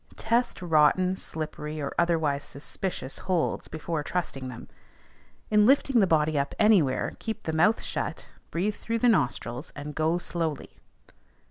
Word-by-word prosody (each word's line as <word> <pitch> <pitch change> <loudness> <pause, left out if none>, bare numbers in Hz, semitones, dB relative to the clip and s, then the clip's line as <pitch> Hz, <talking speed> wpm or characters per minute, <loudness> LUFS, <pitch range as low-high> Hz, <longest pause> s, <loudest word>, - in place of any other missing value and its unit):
Test 230 -3 0
rotten, 175 +3 +4
slippery, 155 -3 -5
or 140 - -3
otherwise 160 -5 +1
suspicious 140 0 -5
holds, 180 -3 -1
before 160 0 -3
trusting 145 -5 -3
them. 120 - -9 0.8
In 210 0 +5
lifting 275 -2 +4
the 195 - +4
body 155 -2 +2
up 140 - -2
anywhere, 185 -12 +3
keep 220 -1 -5
the 160 - -3
mouth 175 +8 +3
shut, - - -4 0.2
breathe 195 +5 0
through 230 +2 -3
the 245 - +2
nostrils, 130 - 0
and 150 +1 -6
go 160 +3 +1
slowly. 165 -4 -3
165 Hz, 140 wpm, -27 LUFS, 150-195 Hz, 0.8 s, In